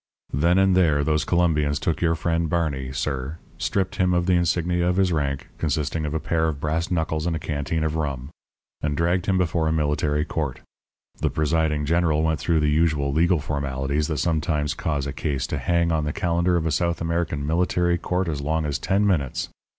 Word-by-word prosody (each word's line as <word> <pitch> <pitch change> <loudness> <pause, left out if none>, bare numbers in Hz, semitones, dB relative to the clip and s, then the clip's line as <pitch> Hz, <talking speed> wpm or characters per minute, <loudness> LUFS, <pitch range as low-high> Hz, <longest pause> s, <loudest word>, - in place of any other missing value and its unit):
"Then 85 +6 +3
and 95 -1 +4
there 80 -6 +3
those 75 +1 +1
Colombians 75 -5 +1
took 80 - -1
your 85 -1 +2
friend 85 0 0
Barney, 75 -6 -1
sir, 70 +2 -3 0.2
stripped 95 -2 -1
him 90 -1 +2
of 85 0 +1
the 90 - +3
insignia 85 0 +1
of 90 - +1
his 95 -1 +2
rank, 70 -3 -2
consisting 75 0 -1
of 75 - -3
a - - +1
pair 80 0 0
of 75 -3 -2
brass 80 +4 -1
knuckles 80 -2 -1
and 85 - 0
a - - -3
canteen 75 +1 -2
of 80 0 -1
rum, 70 -3 -3 0.5
and 75 -1 -1
dragged 85 +2 +1
him 95 -2 +2
before 85 -2 +1
a - - +2
military 75 -1 0
court. 75 -5 -3 0.6
The - - +1
presiding 80 -1 0
general 80 -1 +2
went 80 -1 +1
through 80 -2 +1
the 75 0 +2
usual 75 -3 +1
legal 85 +2 +3
formalities 70 0 -2
that 75 - -2
sometimes 75 -1 0
cause 75 -4 -2
a 70 - -4
case 70 -4 -2
to - - -3
hang 85 -1 +1
on 80 -2 +1
the 75 - -2
calendar 85 +1 +1
of 85 -2 0
a 80 - 0
South 85 +2 0
American 85 -3 -1
military 85 +2 +1
court 90 +2 -1
as 75 -3 -2
long 80 +2 -1
as 75 0 -2
ten 100 +2 +1
minutes. 75 -10 0
80 Hz, 205 wpm, -24 LUFS, 75-85 Hz, 0.6 s, and